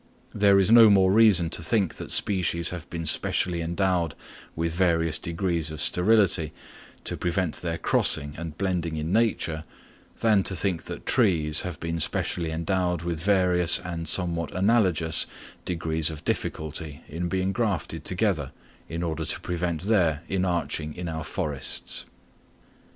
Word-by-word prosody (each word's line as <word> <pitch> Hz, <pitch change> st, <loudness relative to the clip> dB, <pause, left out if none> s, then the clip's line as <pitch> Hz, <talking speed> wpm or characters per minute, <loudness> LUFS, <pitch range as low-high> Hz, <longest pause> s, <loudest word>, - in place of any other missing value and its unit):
There 100 Hz, -1 st, +4 dB
is 95 Hz, +2 st, +2 dB
no 115 Hz, -2 st, +8 dB
more 95 Hz, -2 st, +4 dB
reason 100 Hz, -6 st, +5 dB
to -, -, 0 dB
think 95 Hz, +1 st, +1 dB
that -, -, -7 dB
species 85 Hz, -4 st, +2 dB
have 85 Hz, -1 st, -8 dB
been 85 Hz, -1 st, -5 dB
specially 85 Hz, +2 st, +1 dB
endowed 85 Hz, -1 st, -1 dB, 0.4 s
with 85 Hz, 0 st, -2 dB
various 85 Hz, -3 st, +1 dB
degrees 85 Hz, -1 st, -2 dB
of 80 Hz, -1 st, -7 dB
sterility 90 Hz, -5 st, +3 dB, 0.5 s
to -, -, -2 dB
prevent 90 Hz, -1 st, -2 dB
their 85 Hz, -2 st, -3 dB
crossing 75 Hz, -2 st, +3 dB
and 80 Hz, -1 st, -7 dB
blending 90 Hz, -4 st, -2 dB
in 80 Hz, +4 st, -3 dB
nature, 95 Hz, -9 st, 0 dB, 0.6 s
than 110 Hz, -3 st, +4 dB
to 95 Hz, -, 0 dB
think 90 Hz, -2 st, -1 dB
that -, -, -8 dB
trees 85 Hz, -, +2 dB
have 90 Hz, -4 st, -6 dB
been 85 Hz, 0 st, -3 dB
specially 85 Hz, +1 st, -2 dB
endowed 90 Hz, +1 st, -1 dB
with 85 Hz, -2 st, -3 dB
various 90 Hz, -3 st, +3 dB
and 85 Hz, -2 st, -6 dB
somewhat 85 Hz, -1 st, 0 dB
analogous 95 Hz, -6 st, +2 dB, 0.4 s
degrees 80 Hz, -2 st, 0 dB
of 80 Hz, -2 st, -9 dB
difficulty 80 Hz, 0 st, -4 dB
in 85 Hz, +3 st, -4 dB
being 95 Hz, +1 st, -1 dB
grafted 100 Hz, -, -2 dB
together 90 Hz, -7 st, -1 dB, 0.4 s
in 85 Hz, +1 st, -4 dB
order 80 Hz, -3 st, -3 dB
to -, -, -1 dB
prevent 85 Hz, -1 st, -3 dB
their 85 Hz, -7 st, +1 dB
inarching 85 Hz, -4 st, -2 dB
in 90 Hz, 0 st, -6 dB
our 80 Hz, -1 st, -4 dB
forests. 75 Hz, -4 st, -2 dB
85 Hz, 145 wpm, -25 LUFS, 80-95 Hz, 0.6 s, no